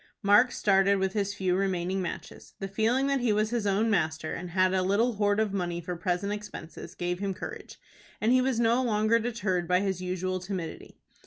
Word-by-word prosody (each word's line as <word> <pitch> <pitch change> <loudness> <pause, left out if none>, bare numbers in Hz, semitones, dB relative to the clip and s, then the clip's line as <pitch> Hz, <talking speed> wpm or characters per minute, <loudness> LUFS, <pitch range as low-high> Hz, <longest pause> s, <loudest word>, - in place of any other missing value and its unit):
Mark 205 +5 +5
started 195 0 +3
with 190 0 -1
his 200 -1 -1
few 185 -3 0
remaining 190 -1 -1
matches. 175 - -7
The 195 - -4
feeling 225 +7 +1
that 275 -1 +1
he 240 -3 +1
was 215 +1 +1
his 235 -4 -1
own 200 +3 +2
master, 160 -4 0
and 180 0 -5
had 185 +1 +2
a 190 - +2
little 205 +6 +2
hoard 205 0 +2
of 215 -2 0
money 175 -3 -2
for 175 +1 -5
present 180 +4 -1
expenses, 210 -5 -8
gave 175 0 -2
him 195 -1 -2
courage, - - -8 0.4
and 220 - +2
he 255 0 +5
was 255 -2 0
no 235 +2 +3
longer 220 -1 +2
deterred 210 -7 -1
by 180 +1 +3
his 190 -2 -2
usual 185 0 -2
timidity. 180 -3 -6
195 Hz, 200 wpm, -28 LUFS, 185-215 Hz, 0.4 s, Mark